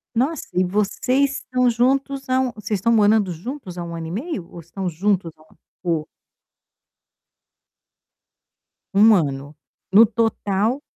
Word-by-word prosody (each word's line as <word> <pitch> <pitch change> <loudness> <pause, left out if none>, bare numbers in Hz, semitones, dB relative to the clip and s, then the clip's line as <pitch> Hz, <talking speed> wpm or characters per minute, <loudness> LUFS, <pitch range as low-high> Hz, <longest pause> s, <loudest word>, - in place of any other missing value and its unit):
Nossa, 275 +6 0
e 185 - +2
vocês 250 +8 0
estão 250 0 0
juntos 270 +3 0
há 255 0 +3
um 260 -1 0
vocês 215 -2 -3
estão 230 +5 +1
morando 210 -3 +3
juntos 185 - -7
há - - -3
1 170 0 -6
ano 165 -1 -5
e - - -6
meio? 215 - -4
Ou 175 - -10
estão 175 +3 -6
juntos 180 0 0
há - - -24
1 - - -20
ano? - - -25 0.2
O 165 -4 -1 2.9
1 215 +2 +6
ano? 145 -3 -2 0.4
No 215 +4 +8
total? 225 +2 0
210 Hz, 150 wpm, -21 LUFS, 175-250 Hz, 2.9 s, No